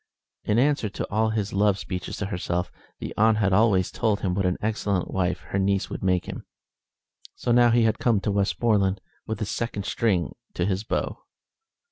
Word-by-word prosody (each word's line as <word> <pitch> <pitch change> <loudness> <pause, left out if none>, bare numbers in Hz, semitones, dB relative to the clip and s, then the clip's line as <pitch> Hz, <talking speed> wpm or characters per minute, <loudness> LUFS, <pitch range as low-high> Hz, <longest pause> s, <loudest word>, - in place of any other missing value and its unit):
In 105 - +2
answer 135 -4 +2
to - - -5
all 110 +2 +2
his 110 -2 -2
love 100 0 +3
speeches 90 -3 -5
to 105 - -2
herself, 90 -2 -2 0.3
the - - -6
aunt 110 0 +4
had 105 -3 +2
always 95 -3 +3
told 110 -3 0
him 90 -2 0
what 95 0 +1
an 90 - 0
excellent 105 -4 -1
wife 90 -1 0
her 100 - 0
niece 100 0 0
would - - -5
make 90 -2 +1
him. - - -7 0.9
So 120 - -2
now 120 0 +6
he 120 0 +4
had 110 -1 +1
come 115 -4 +3
to 105 - -1
Westmoreland 100 -1 +1 0.3
with 110 - -2
this 105 -1 -3
second 100 -4 -3
string 95 -10 0 0.2
to 85 - 0
his 95 +1 -1
bow. - - -2
100 Hz, 190 wpm, -25 LUFS, 95-110 Hz, 0.9 s, now